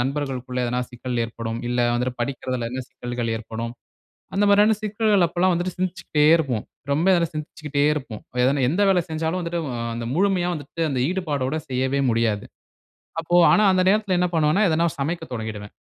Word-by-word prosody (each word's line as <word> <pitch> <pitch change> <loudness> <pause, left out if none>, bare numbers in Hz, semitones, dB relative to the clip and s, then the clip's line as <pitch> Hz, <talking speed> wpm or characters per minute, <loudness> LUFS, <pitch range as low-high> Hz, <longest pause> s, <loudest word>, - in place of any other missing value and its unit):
நண்பர்களுக்குள்ள 130 -2 -2
எதனா 125 +1 -1
சிக்கல் 125 0 -3
ஏற்படும். 115 0 -5
இல்ல 125 0 -1 0.2
வந்து 125 +1 0
படிக்கிறதில 130 -3 -3
என்ன 130 0 -3
சிக்கல்கள் 120 -2 -3
ஏற்படும். 115 +1 -5 0.6
அந்த 205 - +2
மாதிரியான 210 +2 +5
சிக்கல்கள் 210 -3 +2
அப்போலாம் 180 +2 +2
வந்துட்டு 175 +1 -2
சிந்திச்சுக்கிட்டே 175 -5 0
இருப்போம். 130 -9 -2 0.3
ரொம்ப 175 +6 +3 0.2
சிந்திச்சுக்கிட்டே 150 -1 -3
இருப்போம். 130 -8 -6 0.2
எத 130 - +5 0.2
எந்த 175 +8 0
வேலை 180 -3 +3
செஞ்சாலும் 160 +3 -1
வந்துட்டு 170 0 -2 0.3
அந்த 115 0 -4
முழுமையா 185 -2 +2
வந்துட்டு 150 +3 -7
அந்த 125 -2 0
ஈடுபாடோட 155 -6 -1
செய்யவே 130 +2 0
முடியாது. 115 -3 0 0.8
அப்போ 175 +2 +1 0.2
ஆனா 215 - +5
அந்த 185 0 +3
நேரத்துல 205 -3 +2
என்ன 180 0 +2
பண்ணுவேன்னா, 160 +6 +3
எதனா 165 +2 +2 0.2
சமைக்கத் 160 0 -3
தொடங்கிடுவேன்! 110 -2 -6
145 Hz, 155 wpm, -23 LUFS, 125-175 Hz, 0.8 s, மாதிரியான